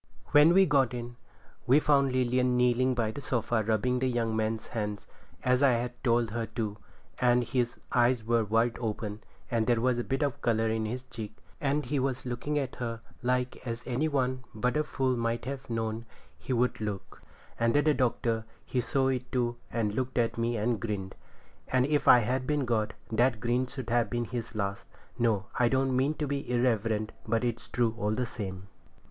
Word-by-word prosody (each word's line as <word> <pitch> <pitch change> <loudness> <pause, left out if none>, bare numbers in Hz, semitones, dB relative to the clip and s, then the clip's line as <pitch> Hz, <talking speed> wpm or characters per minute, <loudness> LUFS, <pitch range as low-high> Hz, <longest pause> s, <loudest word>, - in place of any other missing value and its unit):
When 150 +4 +7
we 195 0 +7
got 135 -6 +2
in, 120 0 -6 0.5
we 135 +4 +6
found 140 -3 +3
Lilian 125 0 +2
kneeling 125 +1 +3
by 115 -3 0
the 140 - -7
sofa 120 -3 0
rubbing 115 +4 +1
the 130 - +1
young 115 -2 0
man's 110 0 -1
hands 105 -3 -3 0.4
as 125 +1 +3
I 140 -3 +5
had 120 +1 -3
told 120 -3 +2
her 115 0 -2
to, 105 -3 -3 0.4
and 125 0 +4
his 120 -1 -1 0.2
eyes 120 -1 +3
were 115 -1 +1 0.3
open, 110 -2 -4 0.3
and 115 -2 +1
there 120 -2 +3
was 125 0 +1
a - - -1
bit 135 +4 -1
of 140 -3 -2
colour 115 -1 +2
in 110 0 0
his 125 +3 -4
cheek, 110 -4 -8 0.2
and 145 +1 0
he 145 - -1
was 130 -1 -1
looking 125 +5 -2
at 135 -3 -2
her 115 -2 -3 0.2
like 125 +1 0
as 115 +1 -4
any 130 +5 0
one 130 -3 0
but 125 +5 0
a 150 - +2
fool 130 -3 0
might 115 0 -1
have 135 0 -6
known 115 0 -2 0.3
he 75 - -7
would 125 -2 +1
look; 105 -3 -5 0.4
and 115 0 +2
the 150 +1 +4
Doctor, 115 -4 0 0.2
he 125 - 0
saw 135 +1 +1
it 125 -1 -2
too, 120 -2 0
and 110 -3 0
looked 130 +3 -2
at 115 -1 +2
me 115 0 0
and 115 +2 0
grinned; 100 -4 -3 0.5
and 130 0 +2
if 145 +1 +1
I 125 - +9
had 130 +3 -1
been 150 -3 +1
God, 110 -3 0 0.2
that 120 +1 +2
grin 120 +3 0
should 125 -2 -6
have 120 -3 +2
been 120 +1 -1
his 115 -2 -5
last. 100 -1 -3 0.3
No, 110 -5 +2
I 120 -1 +4
don't 130 0 +1
mean 135 +4 +2
to 150 - -2
be 140 -2 -3
irreverent, 115 -3 +1 0.2
but 115 +2 +1
it's 120 -1 -3
true, 120 -2 +1
all 105 -1 0
the 125 - 0
same. 95 -5 -6
120 Hz, 195 wpm, -29 LUFS, 115-130 Hz, 0.5 s, I